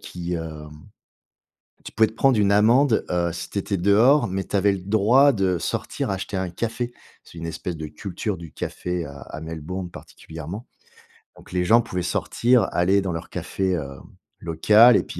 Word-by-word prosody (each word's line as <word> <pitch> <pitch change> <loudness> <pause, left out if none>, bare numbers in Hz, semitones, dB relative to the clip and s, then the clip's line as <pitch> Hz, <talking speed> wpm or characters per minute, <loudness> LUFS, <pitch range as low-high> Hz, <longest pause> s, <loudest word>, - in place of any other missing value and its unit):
qui, 90 0 -5
heu 80 -2 -7 1.2
tu - - -10
pouvais 110 -1 +3
te - - -13
prendre 130 0 +3
une 100 -1 +3
amende, 115 +4 +4
heu, 85 -1 0
si 85 - -6
tu - - -12
étais 100 -1 -2
dehors, 110 +9 +4
mais 95 +1 -3
tu - - -11
avais 100 +1 +3
le 95 - -4
droit 110 +8 +4
de 95 -5 +1
sortir - - -3
acheter 95 +1 -3
un 95 -1 -2
café. 120 +6 -3 0.3
C'est 85 - -13
une 85 - -5
espèce 80 +1 -5
de 80 - -5
culture 95 +5 -5
du 85 -2 -11
café 90 -3 -4
à 70 0 -10
à 80 - -8
Melbourne, 80 +3 -6
particulièrement. 80 - -9 0.7
Donc - - -16
les 90 0 0
gens 115 +6 +5
pouvaient 90 -6 -4
sortir, 115 +5 +1
aller 95 +3 +3
dans 95 -3 -3
leur 80 - -6
café, 95 -1 -2
hem, 70 -6 -4 0.4
local, 105 +8 +6
et - - +1
puis - - -9
95 Hz, 185 wpm, -23 LUFS, 85-110 Hz, 1.2 s, local